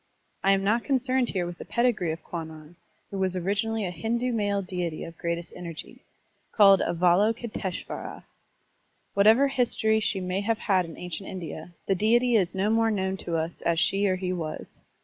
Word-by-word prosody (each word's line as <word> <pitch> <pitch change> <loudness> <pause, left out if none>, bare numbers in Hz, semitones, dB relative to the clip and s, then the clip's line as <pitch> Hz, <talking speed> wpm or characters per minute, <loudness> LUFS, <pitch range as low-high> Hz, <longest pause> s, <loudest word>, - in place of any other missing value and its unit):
I 195 - +5
am 195 0 +1
not 225 +4 +2
concerned 260 -2 +1
here 180 -3 -1
with 175 0 -7
the - - -6
pedigree 235 -9 +1
of 160 - -6
Kwannon, 160 -1 -8 0.4
who 195 - -4
was 185 -1 +1
origi 200 +4 0
nally 225 -2 -1
a 180 - -3
Hindu 235 +8 -1
male 205 -2 0
deity 180 -3 -3
of 165 - -8
greatest 170 +1 -3
energy, 170 -3 -8 0.5
called 195 -3 +7
Avalokiteshvara. 190 +3 0 0.9
Whatever 220 +7 +5
history 225 -4 +1
she 205 -2 0
may 185 +1 -2
have 225 +2 0
had 185 -4 +1
in 165 - -10
ancient 180 +2 -6
India, 175 -2 -7
the 195 - +2
deity 235 +5 +3
is 190 -4 +2
no 200 +3 +1
more 225 0 +3
known 190 -3 -1
to 170 -3 -3
us 160 +1 -4
as 170 -1 +1
she 200 +3 +2
or 185 - +2
he 185 0 -2
was. 160 -3 -5
195 Hz, 180 wpm, -27 LUFS, 175-220 Hz, 0.9 s, called